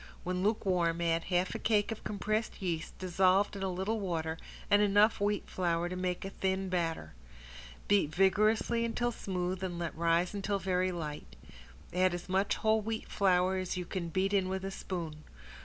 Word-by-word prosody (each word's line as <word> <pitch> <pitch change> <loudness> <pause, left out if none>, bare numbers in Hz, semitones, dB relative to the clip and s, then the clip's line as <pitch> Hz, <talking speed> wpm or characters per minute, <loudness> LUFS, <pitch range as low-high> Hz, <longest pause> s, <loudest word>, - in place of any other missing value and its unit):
When 180 0 -2
lukewarm 180 -5 +1
add 165 -1 +1
half 180 0 0
a - - -4
cake 210 -1 +2
of 225 - -6
compressed 215 +2 -2
yeast 170 -4 -3
dissolved 185 +2 +2
in 195 - -6
a 190 - 0
little 190 +5 -1
water 165 -4 -2 0.3
and 205 0 +5
enough 205 +1 +4
wheat 205 0 0
flour 175 -1 0
to 180 - -4
make 180 0 -2
a 195 - -5
thin 190 0 -1
batter. 165 - -2 0.7
Beat 200 -7 +3
vigorously 215 +6 +2
until 240 +1 0
smooth 185 -3 -3
and 180 -2 -3
let 170 -1 -3
rise 170 +2 +2
until 200 0 -1
very 185 -1 0
light. 155 -4 -6 0.6
Add 185 0 +3
as 175 - -7
much 190 +2 +1
whole 220 0 +2
wheat 220 +1 -4
flour 185 -1 +2
as 185 0 -2
you 180 - -3
can 170 -1 -4
beat 190 +4 0
in 190 -2 +2
with 190 0 -3
a 195 - -3
spoon. 165 -6 -5
185 Hz, 180 wpm, -32 LUFS, 175-200 Hz, 0.7 s, and